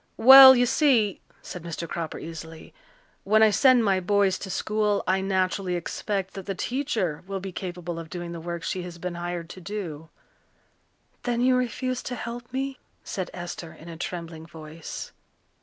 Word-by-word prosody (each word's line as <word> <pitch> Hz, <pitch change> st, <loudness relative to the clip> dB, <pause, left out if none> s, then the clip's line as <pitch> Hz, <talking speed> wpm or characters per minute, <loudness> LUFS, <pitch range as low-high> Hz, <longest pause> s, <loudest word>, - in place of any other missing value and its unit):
"Well, 265 Hz, +2 st, +11 dB
you 245 Hz, 0 st, +3 dB
see," 245 Hz, -, +2 dB, 0.2 s
said 180 Hz, -, -7 dB
Mr. 170 Hz, 0 st, -5 dB
Cropper 165 Hz, -2 st, -4 dB
easily, 160 Hz, 0 st, -9 dB, 0.5 s
"when 215 Hz, +2 st, +4 dB
I 215 Hz, -, +6 dB
send 255 Hz, 0 st, +5 dB
my 195 Hz, -2 st, +3 dB
boys 195 Hz, 0 st, +2 dB
to 195 Hz, -, -7 dB
school 210 Hz, +1 st, 0 dB
I 190 Hz, +1 st, +1 dB
naturally 190 Hz, -1 st, 0 dB
expect 190 Hz, +2 st, -3 dB
that 195 Hz, -1 st, -8 dB
the 195 Hz, -, -2 dB
teacher 220 Hz, -, -2 dB
will 195 Hz, 0 st, -3 dB
be 190 Hz, 0 st, -6 dB
capable 175 Hz, -2 st, -5 dB
of 165 Hz, -1 st, -9 dB
doing 175 Hz, 0 st, -6 dB
the 170 Hz, -, -6 dB
work 170 Hz, 0 st, -5 dB
she 185 Hz, -, -2 dB
has 175 Hz, -1 st, -8 dB
been 180 Hz, +1 st, -5 dB
hired 175 Hz, -1 st, -5 dB
to 185 Hz, -, -11 dB
do." 170 Hz, -5 st, -6 dB, 1.1 s
"Then 240 Hz, -1 st, -1 dB
you 255 Hz, +1 st, +4 dB
refuse 250 Hz, 0 st, -1 dB
to 245 Hz, -, -5 dB
help 240 Hz, +1 st, -7 dB
me?" 270 Hz, +1 st, -3 dB, 0.2 s
said 185 Hz, -2 st, -4 dB
Esther 175 Hz, -2 st, -7 dB
in 165 Hz, -, -13 dB
a 165 Hz, -, -7 dB
trembling 165 Hz, -1 st, -6 dB
voice. 155 Hz, 0 st, -8 dB
185 Hz, 175 wpm, -26 LUFS, 170-220 Hz, 1.1 s, Well